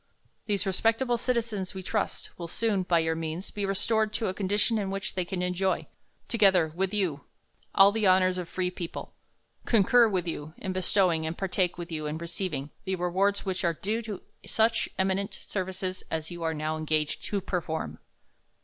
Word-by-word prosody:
These 205 -1 0
respectable 225 +5 +2
citizens, 225 -7 -1
we 190 - -5
trust, 210 +2 -2
will 170 - -6
soon, 210 +2 +1
by 180 -2 +2
your 160 0 +2
means, 165 +3 -4
be 205 -1 -2
restor 215 +3 +2
ed 215 - -15
to 225 - -1
a - - -2
condition 205 +4 +1
in 195 -2 -2
which 195 0 -3
they 185 - 0
can 180 +1 -3
enjoy, 180 +1 0 0.4
together 190 -7 +4
with 190 +1 0
you, 180 -9 -1 0.5
ail 195 +1 +9
the 215 -1 +1
honors 185 0 +4
of 175 - -4
a - - -21
free 180 -1 -1
people; 175 -2 -6 0.5
concur 235 +2 +6
with 185 -3 -1
you, 155 -1 -5
in 190 -2 -3
bestowing, 180 -3 +2
and 160 - -4
partake 185 -2 0
with 175 -1 -6
you 155 -2 -3
in 150 +1 -2
receivmg, 165 -4 -3
the 190 - -1
rewards 190 +4 +1
which 190 -1 -2
are 170 -1 +2
due 215 +7 -1
to 215 -4 -6 0.2
such 225 +1 +2
eminent 190 +1 0
services 185 -1 -4
as 160 +1 -3
you 175 -1 -7
are 160 -1 0
now 155 +1 -1
engaged 155 -1 0
to 205 - -1
perform. 175 -4 -3
185 Hz, 185 wpm, -28 LUFS, 170-200 Hz, 0.5 s, ail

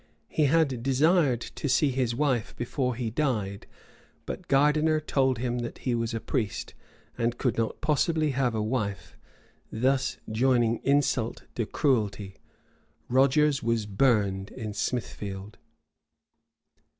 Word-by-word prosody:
He 155 - +2
had 140 -4 +2
desired 135 0 +3
to 145 - -5
see 140 +3 +3
his 125 -2 0
wife 130 -5 0
before 125 +1 -2
he 115 -2 -3
died; 110 -8 -2 0.6
but - - -6
Gardiner 150 +3 +3
told 135 -4 +1
him 120 +1 -2
that 120 0 -5
he 125 - -2
was 115 -1 -1
a - - -1
priest, 110 -3 -3 0.5
and 120 +1 0
could 125 -5 0
not 115 -1 -2
possibly 155 +1 +1
have 125 -3 0
a 110 - 0
wife; 105 -7 -3 0.6
thus 130 +3 +1
joining 120 0 +2
insult 135 -4 +1
to 115 -3 -2
cruelty. 105 - 0 0.7
Rogers 140 +3 +3
was 115 -2 0
burned 100 -3 +1
in 110 -4 -6
Smithfield. 100 -3 -4
125 Hz, 125 wpm, -27 LUFS, 110-140 Hz, 0.7 s, desired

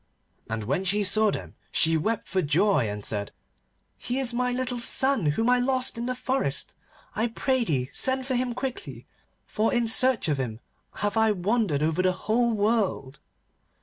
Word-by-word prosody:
And 110 -1 -3
when 140 - -1
she 205 +2 0
saw 215 +2 +4
them - - -5 0.2
she 165 -1 +2
wept 215 +8 -1
for 190 - 0
joy, 150 - +2
and 105 0 -6
said, 105 -1 -2 0.7
'He 245 - -3
is 260 -3 0
my 250 +1 0
little 250 0 -2
son 265 - +3
whom 225 +11 +1
I 250 0 +4
lost 255 0 +1
in 235 +1 -4
the 255 - -2
forest. 255 - -2 0.4
I 220 +3 +1
pray 260 +2 0
thee 135 - -2
send 260 0 +1
for 260 - -2
him 245 -1 -1
quickly, 255 0 -5 0.4
for 220 +1 0
in 240 -1 +1
search 250 -3 +2
of 145 -3 0
him 115 -4 -4 0.5
have 205 +1 -1
I 220 -1 +4
wandered 195 -5 0
over 160 +3 +1
the 185 0 +2
whole 230 +5 0
world. 205 - -1
220 Hz, 180 wpm, -26 LUFS, 160-245 Hz, 0.7 s, saw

